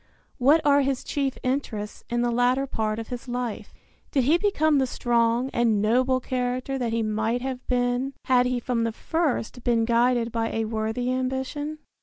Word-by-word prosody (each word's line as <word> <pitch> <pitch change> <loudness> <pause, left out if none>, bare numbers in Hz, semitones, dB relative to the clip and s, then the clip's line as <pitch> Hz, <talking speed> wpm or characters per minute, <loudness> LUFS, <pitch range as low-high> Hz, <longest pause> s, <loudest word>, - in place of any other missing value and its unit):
What 290 +6 +5
are 285 -1 +5
his 270 -1 -1
chief 275 -2 -2
interests 245 -6 -3
in 240 0 0
the 240 - +1
latter 250 +3 +2
part 220 -5 -2
of 225 -1 -6
his 245 0 -6
life? 245 -2 -4 0.4
Did 270 -4 +1
he 310 +7 +3
become 315 -8 +2
the 265 - +1
strong 240 +1 +1
and 230 -3 +2
noble 255 +5 +2
character 255 +1 -2
that 240 -2 -1
he 230 0 0
might 220 +3 -1
have 260 -1 -5
been 245 +2 0
had 250 -1 +4
he 250 -1 0
from 235 -1 -1
the 230 -1 -1
first 270 -6 -2
been 230 -2 +2
guided 235 0 +2
by 225 0 -1
a 225 0 0
worthy 220 +3 -2
ambition? 265 +4 -3
245 Hz, 180 wpm, -25 LUFS, 230-265 Hz, 0.4 s, What